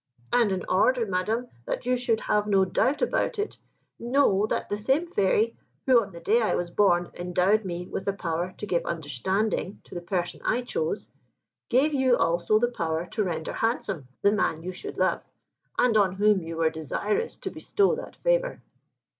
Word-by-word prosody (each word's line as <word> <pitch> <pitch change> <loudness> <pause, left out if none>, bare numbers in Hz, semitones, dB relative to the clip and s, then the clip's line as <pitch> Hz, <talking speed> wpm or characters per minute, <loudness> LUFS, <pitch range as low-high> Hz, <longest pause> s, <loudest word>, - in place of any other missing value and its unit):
And 235 -4 +4
in 185 -1 -2
order, 235 +6 +3
Madam, 215 +6 -1 0.2
that - - -3
you 250 0 +2
should 240 -3 0
have 210 0 +1
no 195 -2 +4
doubt 255 - +1
about - - 0
it, 415 +1 -3 0.4
know 235 -5 +2
that - - -2
the - - -1
same 270 +10 +1
fairy, 225 - +1 0.3
who, 255 -3 +6
on 205 -2 -7
the 170 - -10
day 220 +7 +2
I 220 - +1
was 175 -1 -2
born, 175 -3 +2
endowed 180 +4 +1
me 175 -1 -4
with 190 - -5
the 200 - 0
power 175 -1 -2
to - - -5
give 175 -4 0
understanding 185 - -2
to - - -15
the 175 - -4
person 175 0 -3
I 250 - +1
chose, 465 - -2 0.6
gave 275 +5 +3
you 260 -3 +3
also 170 +5 +2
the 240 +2 +1
power 165 -5 -2
to 215 - 0
render 170 -4 -3
handsome 195 - -1 0.2
the 200 - +5
man 185 -6 0
you 185 - -4
should 415 - -8
love, - - +1 0.5
and 245 -3 +3
on 200 -4 +4
whom 205 0 +3
you 165 0 -6
were 160 -1 +2
desirous 165 - -2
to - - -5
bestow 405 +2 +1
that - - -8
favour." - - 0
205 Hz, 190 wpm, -26 LUFS, 175-245 Hz, 0.6 s, who